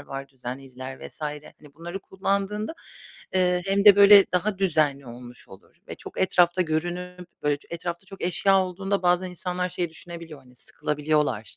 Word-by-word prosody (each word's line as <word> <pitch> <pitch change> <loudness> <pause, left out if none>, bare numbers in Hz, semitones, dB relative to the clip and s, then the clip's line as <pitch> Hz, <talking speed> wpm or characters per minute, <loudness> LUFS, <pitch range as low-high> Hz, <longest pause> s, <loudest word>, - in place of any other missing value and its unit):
var, 135 -1 -7
düzenleyiciler 130 0 -8
vs. - - -11
hani, 150 -1 -8
bunları 175 +4 -7
kullandığında, 200 - -2 0.6
eee, 180 -1 +2
hem 200 +1 +1
de 205 -1 +9
böyle 200 0 +9
daha 195 +2 0
düzenli 150 -7 +1
olmuş 120 +1 -11
olur 95 - -16
ve - - -6
çok - - -8
etrafta 180 -1 +3
görünüp 175 +2 -4
böyle 145 -1 +1
etrafta 170 +2 -5
çok 195 - -11
eşya 195 +2 +3
olduğunda 195 +2 -2
bazen 180 +1 +2
insanlar 180 0 -3
şey 175 0 -2
düşünebiliyor, 165 -1 -10
hani, 125 -1 -21
sıkılabiliyorlar, 150 -7 -2
175 Hz, 150 wpm, -25 LUFS, 145-190 Hz, 0.6 s, de